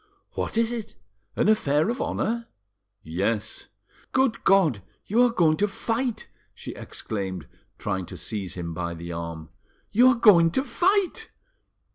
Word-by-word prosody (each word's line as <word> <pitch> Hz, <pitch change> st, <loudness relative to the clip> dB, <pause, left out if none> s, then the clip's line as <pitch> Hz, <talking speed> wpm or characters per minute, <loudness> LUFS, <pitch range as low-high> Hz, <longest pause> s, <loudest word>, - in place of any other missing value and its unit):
"What -, -, -3 dB
is 230 Hz, 0 st, +2 dB
it? 230 Hz, -3 st, -6 dB, 0.4 s
An -, -, +2 dB
affair 155 Hz, -8 st, +3 dB
of 245 Hz, -, -4 dB
honour? 230 Hz, +1 st, -1 dB, 0.6 s
"Yes." 100 Hz, +7 st, -1 dB, 0.5 s
"Good 260 Hz, -3 st, +2 dB
God! 170 Hz, -, +4 dB, 0.2 s
You 225 Hz, +5 st, +2 dB
are 245 Hz, -, +6 dB
going 165 Hz, -8 st, +3 dB
to 205 Hz, -, +2 dB
fight!" 225 Hz, +3 st, -2 dB, 0.3 s
she -, -, -7 dB
exclaimed, 95 Hz, -6 st, -5 dB, 0.3 s
trying 95 Hz, -2 st, -3 dB
to -, -, -8 dB
seize 100 Hz, -4 st, -4 dB
him 85 Hz, -2 st, -5 dB
by 85 Hz, 0 st, -3 dB
the 85 Hz, +1 st, -7 dB
arm. 85 Hz, -1 st, -6 dB, 0.4 s
"You 245 Hz, +4 st, +6 dB
are 255 Hz, -, +6 dB
going 175 Hz, -8 st, +7 dB
to 265 Hz, -, +1 dB
fight!" 365 Hz, -, +1 dB
180 Hz, 145 wpm, -25 LUFS, -, 0.6 s, going